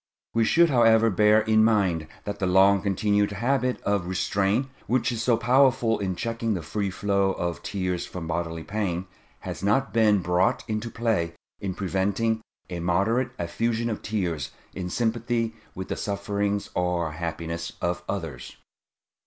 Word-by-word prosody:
We 115 -1 +3
should, 170 +6 +4
however, 115 -2 +5
bear 105 +2 +5
in 110 0 +4
mind 95 -8 +2 0.2
that 100 0 -5
the 95 - 0
long 95 +2 +5
continued 100 +1 +1
habit 125 +4 0
of 100 -3 0
restraint 100 +6 +1 0.2
which 130 +1 +1
is 115 -2 -3
so 120 -1 +3
powerful 125 -1 +3
in 95 -2 -2
checking 115 +2 -2
the 85 - -4
free 100 +5 -2
flow 100 0 +1
of 85 -2 -3
tears 90 -3 -2
from 90 -3 -6
bodily 80 0 -3
pain, 95 -4 -2 0.4
has - - -6
not 105 +8 +1
been 110 -3 +4
brought 90 +2 +2
into 110 +1 -2
play 110 -8 0 0.3
in 95 -2 -4
preventing 100 +4 0 0.3
a 90 - -5
moderate 100 +9 +1
effusion 115 +6 -1
of 110 - -4
tears 85 -10 -2 0.2
in 90 -1 -4
sympathy 115 +1 0 0.2
with 95 0 -5
the - - -1
sufferings 100 0 -2
or 90 -2 0
happiness 85 +1 -4
of 85 0 -2
others. 80 -11 -5
100 Hz, 155 wpm, -26 LUFS, 90-115 Hz, 0.4 s, however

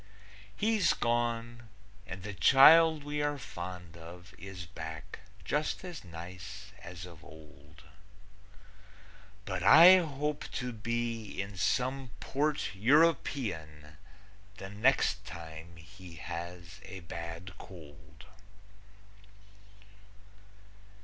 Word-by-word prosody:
He's 210 -5 +3
gone, 120 -1 -1 0.4
and 95 0 -7
the 105 +1 -5
child 155 +7 +7
we 145 0 -3
are 145 0 0
fond 90 - -8
of 90 +3 -12
Is 95 -1 -8
back, 80 -1 -8 0.3
just 150 +4 -1
as 175 -3 -8
nice 90 +1 -9
as 85 0 -8
of 85 -2 -13
old. 75 -1 -16 1.6
But 95 -2 -3
I 170 - +9
hope 150 -3 -2
to 125 -1 -3
be 115 0 -3
in 100 +1 -4
some 130 +7 0
port 145 +5 -1
European 100 - +1 0.6
The 95 -3 -8
next 105 -1 +2
time 85 -2 -10
he 90 +1 -13
has 85 +3 -7
a 95 -1 -9
bad 85 +2 -7
cold. 75 -6 -13
95 Hz, 95 wpm, -31 LUFS, 85-135 Hz, 1.6 s, I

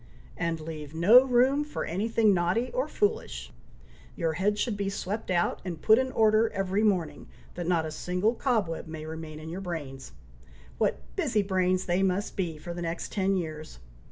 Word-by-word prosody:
"And 165 -1 -2
leave 155 -1 -7
no 215 +10 +7
room 265 +3 +3
for 300 - -4
any 190 +7 -2
thing 220 -2 +4
naughty 185 +7 +1
or - - 0
foolish! 415 - -2 0.6
Your 165 -3 -1
head 205 +5 0
should 225 0 0
be 200 -1 -2
swept 200 +2 -4
out, 175 -1 +1
and 175 -4 -5
put 220 +7 +5
in 260 0 -1
order 220 0 +4
every 195 +1 0
morning, 180 -9 0 0.3
that 175 -1 -5
not 170 -3 +2
a 155 - -4
single 180 +7 0
cobweb 220 -12 -1
may 160 -1 -7
remain 160 -1 -7
in 155 - -9
your 175 +4 -5
brains. 145 - -6 0.7
What - - +1
busy 210 -2 +1
brains 185 -1 +1
they 175 +1 +1
must 195 +2 0
be 170 -5 -2
for 170 +3 -7
the 175 - -6
next 170 0 -4
ten 195 -1 +1
years! 155 - -5
185 Hz, 185 wpm, -28 LUFS, 165-215 Hz, 0.7 s, no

